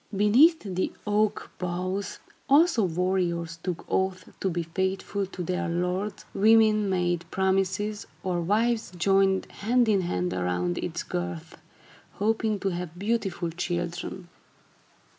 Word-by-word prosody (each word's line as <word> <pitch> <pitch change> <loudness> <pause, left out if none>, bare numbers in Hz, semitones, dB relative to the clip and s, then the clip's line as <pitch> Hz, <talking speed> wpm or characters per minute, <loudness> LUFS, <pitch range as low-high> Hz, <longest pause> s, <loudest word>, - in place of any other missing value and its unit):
Beneath 260 - +5
the 185 -3 -2
oak 210 0 0
boughs, 185 +2 -3 0.3
also, 285 -4 +5
warriors 170 -1 -1
took 175 -2 -4
oaths 190 -1 0 0.2
to 190 - 0
be 170 -1 -2
faithful 190 +3 -2
to 180 -1 -6
their 180 0 -2
lords, 180 +4 -2
women 215 0 +4
made 175 -2 0
promises, 190 +2 0 0.2
or 180 -2 -1
wives 220 +4 +1
joined 195 +1 +3
hand 240 +3 +1
in 205 -3 +3
hand 90 - -1
around 90 -1 -1
its - - -3
girth, 85 -2 -5 0.6
hoping 215 0 0
to 195 - +1
have 175 -2 -5
beautiful 195 -4 -1
children. 175 +1 -4
190 Hz, 125 wpm, -27 LUFS, 175-210 Hz, 0.6 s, Beneath